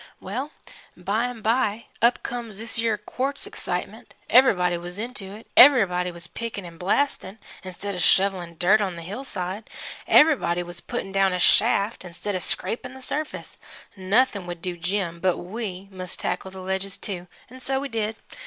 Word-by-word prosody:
"Well, 250 +10 -4 0.5
by 200 +6 0
an' 245 -3 -6
by, 225 -1 +1 0.2
up 235 +2 +3
comes 235 -4 -5
this 225 +1 -3
yer 225 -2 +1
quartz 275 - -3
excitement. 430 +1 -5 0.2
Everybody 180 -9 +5
was 175 +2 -7
into 230 -2 -5
it 220 - -12
everybody 195 -10 +7
was 170 -1 -8
pick'n' 215 0 -6
'n' 165 -1 -11
blast'n' 200 0 0 0.3
instead 190 +2 -5
of 180 - -3
shovelin' 180 -2 +2
dirt 200 +6 +4
on 190 -3 -1
the 170 - -8
hillside 200 -1 -5 0.4
everybody 250 - +5
was 175 0 -7
putt'n' 195 - -4
down 195 -1 +3
a 180 - -1
shaft 210 +2 +3
instead 180 +3 -5
of 185 - -2
scrapin' 250 +7 0
the 265 - -11
surface. 305 +3 -4 0.4
Noth'n' 200 0 +1
would 175 -1 -7
do 180 -2 -3
Jim, 175 0 -2
but 185 0 +2
we 195 0 -6
must 185 -1 -5
tackle 180 +2 -2
the 190 0 -9
ledges, 190 +1 -2
too, 180 -3 -5 0.2
'n' 255 - -11
so 265 +1 +1
we 280 - -3
did. 225 -3 -2
200 Hz, 170 wpm, -25 LUFS, 180-230 Hz, 0.5 s, everybody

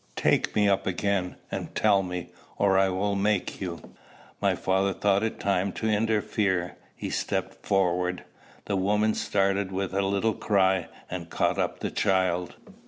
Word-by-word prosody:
"Take - - +1
me 105 -1 +4
up 100 -1 +1
again, 95 0 0 0.2
and - - -5
tell 100 -2 +4
me, 90 -2 -5 0.3
or 100 -1 +3
I 95 0 +4
will 100 +2 0
make 100 0 0
you." 85 -3 -6 0.5
My - - +2
father 95 +1 +1
thought 100 0 +2
it 110 0 -2
time 100 -1 +1
to 110 - -3
interfere. 105 -4 0 0.2
He - - -5
stepped - - -2
forward. 90 -2 +1 0.4
The 100 - -1
mother 105 +3 +2
started 100 -1 0
with 95 0 -2
a 100 - +1
little 100 +3 +1
cry, 95 -5 +2 0.2
and 85 -2 -6
caught - - 0
up - - -1
the - - -2
child. 95 -3 +1
95 Hz, 160 wpm, -27 LUFS, 95-100 Hz, 0.5 s, me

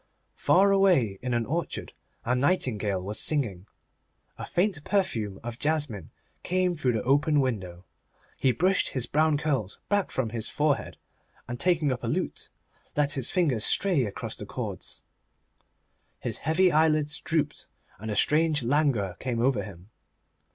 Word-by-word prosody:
Far 195 +2 +4
away, 175 - +3
in 125 -1 -1
an 120 -1 0
orchard, 165 +7 -3 0.3
a 120 - +1
nightingale 120 - 0
was 105 +3 -4
singing. 110 - 0 0.7
A - - -5
faint 175 -5 0
perfume 115 - -1
of 120 0 -6
jasmine 145 - -1 0.3
came 180 0 +1
through 130 -6 0
the 110 - -1
open 145 +3 +3
window. 95 -9 -2 0.5
He 130 - +3
brushed 185 - +1
his 130 -3 -1
brown 155 +3 +2
curls 135 - -2
back 205 -2 +1
from 120 -5 -2
his 115 -1 -2
forehead, 150 -1 0 0.5
and 120 0 -5
taking 165 -6 +2
up 125 - -4
a - - -2
lute, - - -3 0.5
let 145 -1 +2
his 135 -5 0
fingers 145 - +1
stray 180 -4 +2
across 100 - -5
the - - -8
cords. - - -6 1.1
His 115 -3 -4
heavy 175 +4 +3
eyelids 155 -1 +2
drooped, 155 -3 -1 0.3
and 110 +2 -6
a 105 - -2
strange 150 +4 +3
languor 125 - +1
came 125 -3 -2
over 120 -3 +2
him. 95 0 -11
140 Hz, 150 wpm, -27 LUFS, 115-160 Hz, 1.1 s, Far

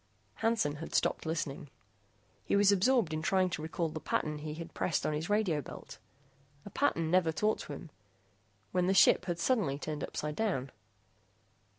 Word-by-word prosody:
Hansen 220 -10 +1
had 165 - -6
stopped - - +1
listening. 150 -3 -3 0.7
He - - 0
was 200 0 +5
absorbed 205 -3 +3
in 155 - -2
trying 185 +2 +2
to 155 - -3
recall 165 +1 -2
the 155 - -6
pattern 150 -1 -1
he 150 0 -5
had 165 +1 -8
pressed 165 - -1
on 155 - 0
his 155 +4 -3
radio 205 -8 +1
belt - - -10 0.7
a 205 - -9
pattern 165 - +1
never 180 -3 +4
taught 210 +7 0
to - - -7
him - - -9 0.8
when 180 -1 +1
the 190 - +2
ship 190 -1 +6
had 175 -2 -2
suddenly 175 - +1
turned 150 0 -5
upsidedown. 150 - -2
165 Hz, 170 wpm, -32 LUFS, 155-200 Hz, 0.8 s, ship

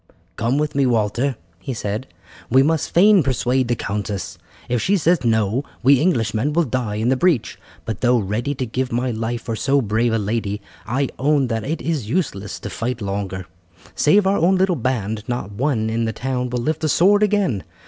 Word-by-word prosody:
"Come 120 +4 0
with 150 0 -1
me, 140 -1 +2
Walter," 120 +3 +1 0.2
he 125 +7 -5
said, 110 +4 -3 0.4
"we 130 +3 +5
must 160 +1 0
fain 200 +2 +6
persuade 130 -2 0
the 120 - +1
countess. 105 -2 -4 0.3
If 120 -2 0
she 200 +2 +2
says 170 -3 +2
no, 110 +2 +1 0.2
we 135 +1 +5
Englishmen 120 -4 +1
will 170 +2 +3
die 125 -6 -2
in 110 +3 0
the 130 - +3
breach; 165 -3 +1 0.3
but 110 -3 -4
though 125 0 +4
ready 115 +7 -2
to 130 - -2
give 125 +2 -3
my 125 +2 0
life 115 +1 -3
for 115 - -3
so 140 +5 +2
brave 115 0 +1
a - - +2
lady, 105 -1 -2 0.3
I 130 +4 0
own 140 -1 +2
that 115 -2 -2
it 160 +4 -3
is 150 -10 -2
useless 120 - -2
to 105 - -5
fight 125 +2 -3
longer. 100 -2 -4 0.5
Save 195 +7 +3
our 195 +1 +3
own 180 +4 +4
little 185 -1 +2
band 110 -5 -2
not 120 -5 -3
one 115 0 0
in 115 +1 0
the 110 - -2
town 125 -1 -2
will 120 -1 -2
lift 155 +4 -1
a 155 - +2
sword 200 +7 +4
again. 205 - +1
125 Hz, 200 wpm, -21 LUFS, 110-145 Hz, 0.5 s, fain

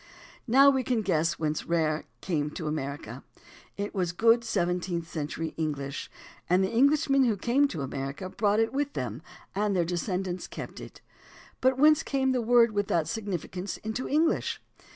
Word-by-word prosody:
Now 275 +4 +7
we 265 -1 +1
can 235 -3 0
guess 165 -2 +1
whence 155 -1 -2
"rare" 160 -2 0 0.2
came 150 -5 -1
to 165 - -5
America. 140 -5 -4 0.5
It 200 +1 -3
was 180 -3 -1
good 230 +4 +4
seventeenth 175 -3 -1
century 160 0 -4
EngUsh, 140 -3 -3 0.4
and 180 +2 +4
the 190 - -1
Eng 260 +5 +5
lishmen 275 -3 +3
who 215 -3 +1
came 255 +8 +2
to 160 - -5
America 135 +6 -4
brought 205 +2 +1
it 225 +1 +1
with 285 +1 -1
them 125 0 -4 0.3
and 205 0 0
their 175 -2 +2
descendants 180 +1 -3
kept - - -8
it. - - -11 0.6
But 260 0 +3
whence 305 +2 +6
came 265 -1 0
the 255 -1 +1
word 235 0 +5
with 205 -1 -1
that 165 -2 +1
significance 190 -1 -4
into 220 +4 -4
English? 315 +3 +1
190 Hz, 170 wpm, -28 LUFS, 160-240 Hz, 0.6 s, Now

